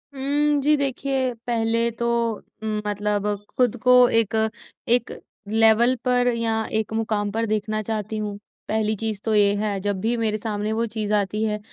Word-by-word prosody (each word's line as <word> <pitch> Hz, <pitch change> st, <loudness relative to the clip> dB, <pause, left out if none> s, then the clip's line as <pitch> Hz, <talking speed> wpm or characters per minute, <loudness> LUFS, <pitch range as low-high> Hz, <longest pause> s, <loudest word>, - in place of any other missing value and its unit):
हुँ, 290 Hz, +2 st, +1 dB
जी 300 Hz, +2 st, +4 dB
देखिए, 270 Hz, -2 st, -1 dB
पहले 230 Hz, 0 st, +1 dB
तो 235 Hz, -, 0 dB, 0.6 s
मतलब 210 Hz, -1 st, -2 dB, 0.3 s
खुद 245 Hz, -2 st, +2 dB
को 250 Hz, -, +5 dB, 0.2 s
एक 225 Hz, -1 st, +2 dB, 0.5 s
एक 240 Hz, 0 st, +3 dB, 0.4 s
लेवल 225 Hz, +3 st, +4 dB
पर 250 Hz, -1 st, +2 dB
या 225 Hz, -1 st, 0 dB, 0.2 s
एक 220 Hz, -, -4 dB
मुक़ाम 215 Hz, -2 st, -1 dB
पर 225 Hz, +2 st, -1 dB
देखना 215 Hz, 0 st, -1 dB
चाहती 215 Hz, 0 st, -4 dB
हूँ 210 Hz, -1 st, -4 dB, 0.3 s
पहली 215 Hz, 0 st, 0 dB
चीज़ 215 Hz, -1 st, -3 dB
तो 220 Hz, -1 st, +1 dB
ये 205 Hz, -1 st, +5 dB
है। 205 Hz, -1 st, -1 dB
जब 200 Hz, -1 st, -1 dB
भी 230 Hz, +3 st, 0 dB
मेरे 220 Hz, -2 st, 0 dB
सामने 210 Hz, -1 st, -3 dB
वो 230 Hz, +1 st, 0 dB
चीज़ 215 Hz, -2 st, -3 dB
आती 210 Hz, +1 st, 0 dB
है, 210 Hz, -1 st, -1 dB
220 Hz, 165 wpm, -23 LUFS, 210-235 Hz, 0.6 s, को